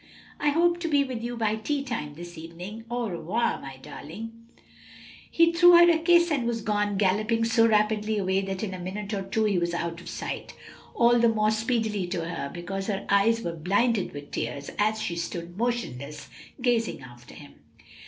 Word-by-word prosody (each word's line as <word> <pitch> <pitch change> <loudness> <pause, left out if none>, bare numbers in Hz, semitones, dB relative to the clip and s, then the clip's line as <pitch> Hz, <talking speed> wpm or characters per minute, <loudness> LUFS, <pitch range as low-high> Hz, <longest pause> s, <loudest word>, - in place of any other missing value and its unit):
"I 295 - +2
hope 345 +3 +2
to 340 - -2
be 290 -3 +3
with 255 -4 -5
you 240 +1 -4
by 220 -1 0
tea 280 +5 -2
time, 225 - -4
this 175 +2 -9
evening. 175 +7 -8
Au 240 -1 -1
revoir, 185 +6 -1 0.2
darling." 215 +10 -8 1.0
He 335 0 +4
threw 350 +1 +7
her 345 0 +8
a 325 - +2
kiss 345 +1 +4
and 260 -6 0
was 230 -2 -2
gone, 210 -1 0
galloping 215 +4 +2
so 230 0 +4
rapidly 215 0 +2
away 190 -1 +1
that 195 0 -4
in 195 -3 -3
a 185 - -6
minute 200 +4 -5
or 200 - -1
two 195 +3 -1
he 205 -4 +2
was 170 0 -1
out 170 0 -3
of - - -9
sight; - - -5 0.4
all 240 0 +5
the 235 0 +5
more 215 -1 +2
speedily 220 -3 -1
to 170 -2 -3
her 155 -4 -4
because 195 +3 -5
her 200 -2 -2
eyes 225 +3 +3
were 170 - -3
blinded 200 +6 +1
with 145 0 -9
tears 140 0 -4
as 215 +1 +2
she 170 - -3
stood 170 0 -5
motionless, 150 - -3 0.3
gazing 235 - 0
after 120 0 -13
him. 145 -1 -14
210 Hz, 190 wpm, -26 LUFS, 175-235 Hz, 1.0 s, her